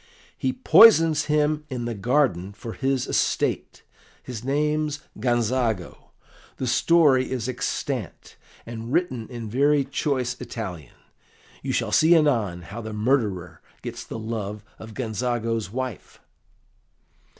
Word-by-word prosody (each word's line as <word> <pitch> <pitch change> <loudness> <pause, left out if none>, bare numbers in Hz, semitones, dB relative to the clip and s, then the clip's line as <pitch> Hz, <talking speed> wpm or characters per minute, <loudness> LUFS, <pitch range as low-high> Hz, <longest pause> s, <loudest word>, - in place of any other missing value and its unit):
"He - - -1
poisons 165 - +6
him 150 0 +1
in 125 -3 -4
the 120 - -2
garden 100 - +1
for 110 +2 -8
his 135 -1 0
estate. - - -1 0.4
His 120 -3 -7
name's 150 +2 0 0.2
Gonzago. 120 -5 -1 0.5
The 130 - -3
story 140 -1 +4
is 125 -3 -3
extant, 125 -1 -4 0.3
and 115 0 -7
written 130 -9 -1
in 120 -3 -6
very 140 +5 +3
choice 130 -2 -2
Italian. 100 -10 -7 0.7
You - - -3
shall - - -1
see 165 +2 +5
anon 115 - +1
how 100 +6 -7
the 110 -1 -6
murderer 105 - -1 0.2
gets - - -6
the - - -7
love 110 -2 -5 0.2
of 110 -1 -10
Gonzago's 115 -2 -2
wife." 130 -1 -6
125 Hz, 120 wpm, -24 LUFS, 110-140 Hz, 0.7 s, poisons